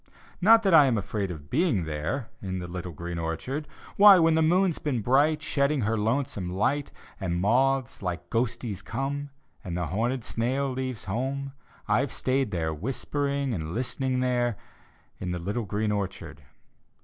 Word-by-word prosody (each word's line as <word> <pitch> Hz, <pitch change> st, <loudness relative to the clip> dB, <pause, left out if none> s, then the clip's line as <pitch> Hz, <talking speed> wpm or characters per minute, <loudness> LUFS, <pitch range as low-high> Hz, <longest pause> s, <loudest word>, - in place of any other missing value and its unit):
Not 225 Hz, +4 st, +7 dB
that 195 Hz, -3 st, +3 dB
I 150 Hz, -4 st, +8 dB
am 120 Hz, -4 st, +2 dB
afraid 100 Hz, 0 st, -2 dB
of 75 Hz, -4 st, -9 dB
being 140 Hz, -, +2 dB
there, 80 Hz, -, -3 dB
In 95 Hz, -2 st, -3 dB
the 90 Hz, -1 st, -5 dB
little 90 Hz, 0 st, -5 dB
green 85 Hz, +2 st, -5 dB
orchard; 125 Hz, -, -3 dB, 0.3 s
Why, 200 Hz, -1 st, +9 dB
when 165 Hz, -2 st, +4 dB
the 160 Hz, -, +3 dB
moon's 175 Hz, +2 st, +3 dB
been 130 Hz, -6 st, -1 dB
bright. 145 Hz, +6 st, +3 dB
Shedding 140 Hz, 0 st, +1 dB
her 110 Hz, +1 st, +1 dB
lonesome 110 Hz, -4 st, -1 dB
light, 130 Hz, +10 st, 0 dB, 0.3 s
And 85 Hz, -3 st, -1 dB
moths 130 Hz, +6 st, +1 dB
like 90 Hz, -2 st, -4 dB
ghosties 115 Hz, -3 st, -1 dB
come, 140 Hz, +6 st, -3 dB, 0.3 s
And 90 Hz, -4 st, -4 dB
the 90 Hz, -, -1 dB
horned 115 Hz, -, -1 dB
snail 130 Hz, +5 st, -1 dB
leaves 130 Hz, -3 st, -3 dB
home: 135 Hz, +6 st, -3 dB, 0.3 s
I've 140 Hz, 0 st, +1 dB
stayed 130 Hz, -1 st, 0 dB
there, 80 Hz, -4 st, -1 dB
whispering 135 Hz, -, -2 dB
and 80 Hz, -2 st, -4 dB
listening 130 Hz, +1 st, -1 dB
there, 120 Hz, -3 st, +1 dB, 0.6 s
In 90 Hz, -1 st, -3 dB
the -, -, -2 dB
little 100 Hz, +6 st, -3 dB
green 105 Hz, +2 st, -1 dB
orchard. 90 Hz, -7 st, -4 dB
120 Hz, 160 wpm, -27 LUFS, 95-140 Hz, 0.6 s, Why